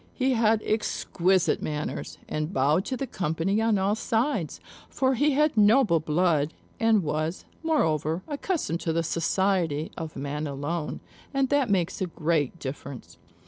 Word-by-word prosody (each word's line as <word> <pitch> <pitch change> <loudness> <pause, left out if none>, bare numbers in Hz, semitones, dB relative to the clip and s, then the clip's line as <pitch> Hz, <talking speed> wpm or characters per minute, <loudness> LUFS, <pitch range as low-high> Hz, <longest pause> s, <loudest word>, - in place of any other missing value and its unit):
He 265 0 +1
had 225 -2 +3
exquisite 190 -4 +1
manners, 150 -1 -4
and 155 +2 -2
bowed 150 +4 +2
to 260 - -3
the 270 - -2
company 185 0 -1
on 225 -2 +3
all 195 +2 +1
sides; 225 - -1 0.3
for 265 0 +1
he 290 +4 +2
had 300 0 +2
noble 210 -4 +5
blood, 155 -1 +1 0.2
and 225 -4 +3
was, 155 +3 -2 0.2
moreover, 165 - +1
accustomed 290 - -2
to 165 - -1
the 165 0 +1
society 170 -2 0
of 160 -2 -6
man 145 +2 -3
alone; 145 +3 -3 0.3
and 270 -1 +2
that 285 -4 +2
makes 190 -2 0
a 185 - 0
great 160 -3 0
difference. 140 -3 -8
180 Hz, 145 wpm, -26 LUFS, 155-225 Hz, 0.3 s, noble